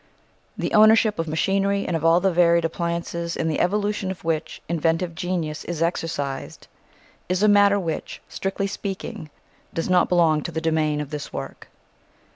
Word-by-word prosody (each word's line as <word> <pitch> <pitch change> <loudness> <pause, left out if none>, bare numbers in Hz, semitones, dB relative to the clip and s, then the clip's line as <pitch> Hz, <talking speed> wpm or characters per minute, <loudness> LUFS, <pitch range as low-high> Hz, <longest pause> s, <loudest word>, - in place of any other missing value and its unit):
The - - -3
ownership 215 -2 +5
of 165 - -1
machinery 195 +5 0
and 175 - -1
of 160 - -2
all 165 +1 +5
the 190 +1 +2
varied 170 -1 +4
appliances 170 0 -3
in 160 - -1
the 155 - -1
evolution 205 0 0
of 190 - -6
which 160 -1 -2
inventive 165 +1 0
genius 165 -3 -3
is 165 -2 -2
exercised 145 -5 -3 0.6
is 185 +2 +1
a - - +6
matter 205 -1 +5
which, 165 -4 -4
strictly 195 +1 -3
speaking, 195 -5 -5 0.5
does 165 +2 -1
not 180 -1 +4
belong 165 -4 +3
to 170 - -5
the 160 - -2
domain 155 -2 0
of 145 - -7
this 150 -1 -5
work. - - -7
170 Hz, 165 wpm, -23 LUFS, 160-195 Hz, 0.6 s, a